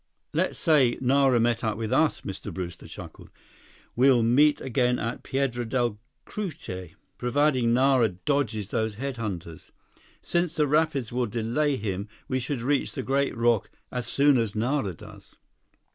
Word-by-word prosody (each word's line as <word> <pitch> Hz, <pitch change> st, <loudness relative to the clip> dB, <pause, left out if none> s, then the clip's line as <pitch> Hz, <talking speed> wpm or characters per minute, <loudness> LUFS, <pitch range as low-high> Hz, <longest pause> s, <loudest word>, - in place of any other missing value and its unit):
"Let's -, -, 0 dB
say 145 Hz, -8 st, +3 dB
that -, -, -9 dB
Nara 135 Hz, -1 st, +4 dB
met 120 Hz, 0 st, +1 dB
up 110 Hz, -2 st, -1 dB
with 110 Hz, -1 st, -2 dB
us," 160 Hz, -2 st, +2 dB
Mr. 100 Hz, +1 st, -6 dB
Brewster 85 Hz, -1 st, -6 dB
chuckled. -, -, -11 dB, 0.7 s
"We'll 125 Hz, -1 st, +5 dB
meet 145 Hz, +6 st, +4 dB
again 125 Hz, -1 st, +1 dB
at 115 Hz, +1 st, -3 dB
Piedra 130 Hz, -3 st, -1 dB
Del 120 Hz, -2 st, -1 dB, 0.3 s
Cucuy, 135 Hz, -, -6 dB, 0.2 s
provided 130 Hz, 0 st, +2 dB
Nara 125 Hz, 0 st, +4 dB
dodges 110 Hz, 0 st, -2 dB
those 110 Hz, -1 st, -1 dB
head 135 Hz, +3 st, -4 dB
hunters. 90 Hz, -7 st, -6 dB, 0.5 s
Since 175 Hz, -1 st, -1 dB
the 150 Hz, -, +3 dB
rapids 145 Hz, -4 st, +1 dB
will 125 Hz, 0 st, 0 dB
delay 120 Hz, +7 st, 0 dB
him, 100 Hz, -3 st, -3 dB, 0.2 s
we 130 Hz, -, 0 dB
should 130 Hz, 0 st, -3 dB
reach 140 Hz, +3 st, 0 dB
the -, -, -4 dB
great 140 Hz, -1 st, 0 dB
rock 115 Hz, -2 st, +2 dB, 0.2 s
as 125 Hz, -3 st, -3 dB
soon 140 Hz, -2 st, +4 dB
as 110 Hz, -3 st, -2 dB
Nara 110 Hz, -, 0 dB
does." -, -, -14 dB
125 Hz, 155 wpm, -26 LUFS, 110-140 Hz, 0.7 s, We'll